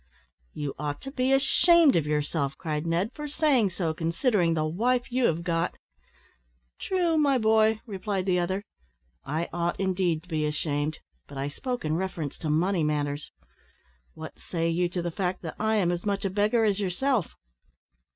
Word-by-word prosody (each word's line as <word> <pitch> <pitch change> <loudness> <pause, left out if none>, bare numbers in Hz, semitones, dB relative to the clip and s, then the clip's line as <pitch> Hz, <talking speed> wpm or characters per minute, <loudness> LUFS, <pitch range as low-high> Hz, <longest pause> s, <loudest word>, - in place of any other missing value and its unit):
"You 145 -2 -3
ought 145 -1 -3
to 270 - -7
be 260 -1 0
ashamed 305 +3 +5
of 155 -3 +1
yourself;" 150 -1 -1
cried 155 0 -3
Ned, 175 +7 0
"for 300 0 -6
saying 280 -8 +2
so, 170 -3 -2
considering 170 - +1
the 155 -1 0
wife 245 +11 0
you 255 0 +2
have 165 -3 +1
got." 170 -1 -1 1.0
"True, 350 -4 +1
my 280 -3 +3
boy," 220 -1 +3
replied 195 -3 -3
the 180 -2 +2
other, 190 +3 -1 0.6
"I 160 +4 -2
ought 175 0 -1
indeed 180 -4 0
to - - -21
be 155 -2 0
ashamed, 150 0 -2 0.3
but 140 - -10
I 140 +1 -2
spoke 245 - -4
in 155 +1 0
reference 175 -6 -4
to 160 - -3
money 170 +3 +2
matters. 145 -1 -2 0.8
What - - -9
say 165 -1 -2
you 175 +1 +1
to 175 0 -3
the 175 - -2
fact, 185 +1 -2
that 160 - -5
I 220 0 +1
am 185 -5 +2
as 175 0 -3
much 200 -1 -1
a 195 - 0
beggar 215 +3 +2
as 205 -1 +1
yourself?" 210 - 0
180 Hz, 175 wpm, -27 LUFS, 160-220 Hz, 1.0 s, ashamed